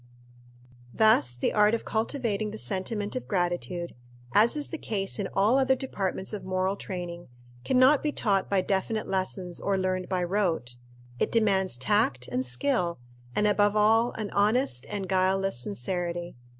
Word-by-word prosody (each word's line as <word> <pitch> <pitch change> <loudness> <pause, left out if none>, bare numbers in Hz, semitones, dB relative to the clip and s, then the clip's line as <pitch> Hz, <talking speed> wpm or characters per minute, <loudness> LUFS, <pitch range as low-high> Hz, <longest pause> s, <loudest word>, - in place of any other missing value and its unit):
Thus 215 - +4
the - - 0
art 210 +1 +4
of 230 - -6
cultivating 220 -2 -1
the 215 - -7
sentiment 205 +2 -2
of 255 - -4
gratitude, 175 -1 -2 0.4
as 230 +7 +4
is 295 - -2
the 325 - -5
case 195 -1 -2
in 200 - -1
all 215 +7 +4
other 265 0 +3
departments 195 -7 -3
of 205 -3 -5
moral 185 +1 0
training, 175 -3 -6 0.4
can 260 - +1
not 265 +3 +6
be 300 - 0
taught 195 -8 0
by 195 -2 +2
definite 200 +3 -1
lessons 185 -2 -3
or 200 -1 0
learned 185 -1 -1
by 185 -2 0
rote. 170 -10 -1 0.4
It - - 0
demands 195 - +2
tact 130 - +1
and 125 - -1
skill, 170 - 0 0.4
and, 210 - +2
above 205 0 +3
all, 225 +3 +4
an 215 -2 -5
honest 205 - +1
and 200 -2 -4
guileless 190 -3 +1
sincerity. 175 - -3
195 Hz, 160 wpm, -27 LUFS, 180-215 Hz, 0.4 s, not